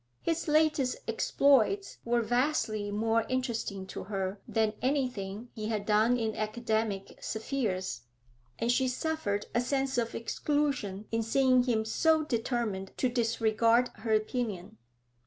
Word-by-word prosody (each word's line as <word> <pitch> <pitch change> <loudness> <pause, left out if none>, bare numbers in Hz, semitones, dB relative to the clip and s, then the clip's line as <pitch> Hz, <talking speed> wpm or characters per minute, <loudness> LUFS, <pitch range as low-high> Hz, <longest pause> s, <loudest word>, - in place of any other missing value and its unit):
His 335 0 -1
latest 300 -4 +3
exploits 285 - +2
were 235 0 +1
vastly 225 -3 0
more 225 +2 +1
interesting 235 -6 -2
to 190 - -7
her 195 0 -3
than 220 -2 +1
anything 245 -5 -2
he 215 -2 -4
had 215 -2 -2
done 220 +4 +3
in 220 -2 -1
academic 215 -2 -2
spheres, 215 - -2 0.6
and 230 +1 +1
she 260 +1 +2
suffered 250 -6 -1
a 240 - +2
sense 270 0 0
of 230 -1 -2
exclusion 240 -5 -1
in 225 0 +1
seeing 255 +3 +4
him 220 -3 +1
so 315 +7 +3
determined 230 -7 -2
to 255 - +1
disregard 230 0 +2
her 220 +1 -4
opinion. 215 -3 -3
230 Hz, 130 wpm, -30 LUFS, 215-255 Hz, 0.6 s, seeing